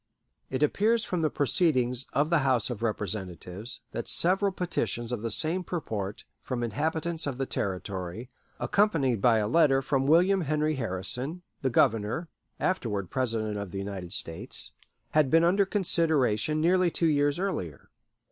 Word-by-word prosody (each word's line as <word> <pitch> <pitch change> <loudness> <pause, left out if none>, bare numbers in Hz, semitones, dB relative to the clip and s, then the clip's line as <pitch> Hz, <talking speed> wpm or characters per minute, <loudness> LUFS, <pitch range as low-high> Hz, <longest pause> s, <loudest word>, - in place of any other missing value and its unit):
It 130 +2 -1
appears 220 +9 +2
from 180 -2 -2
the 155 - +2
proceedings 130 -4 +1
of 150 +3 +1
the 170 - +4
House 130 -4 +1
of 115 - -5
Representatives 100 -1 -4
that - - -4
several 195 +3 +3
petitions 120 - -2
of 120 -4 -3
the 115 - -2
same 160 - +1
purport 105 - -4 0.2
from 125 -2 -3
inhabitants 160 +7 -2
of 135 -3 -3
the 135 - -1
Territory, 95 +3 -4 0.3
accompanied 165 - +2
by 115 -1 +5
a 105 -1 +1
letter 135 +1 +4
from 135 0 0
William 180 +5 +4
Henry 155 0 0
Harrison, 125 - -2 0.2
the 130 - 0
Governor 115 +6 +1 0.3
(afterward 105 - -1
President 110 -5 -1
of 100 -2 -5
the 95 - -6
United 95 -3 -5
States), 80 0 -3 0.4
had 150 -3 +3
been 165 +3 +5
under 190 +3 +3
consideration 155 - +1
nearly 180 +2 +3
two 170 - -1
years 145 -1 +2
earlier. 155 - -4
135 Hz, 150 wpm, -28 LUFS, 110-165 Hz, 0.4 s, by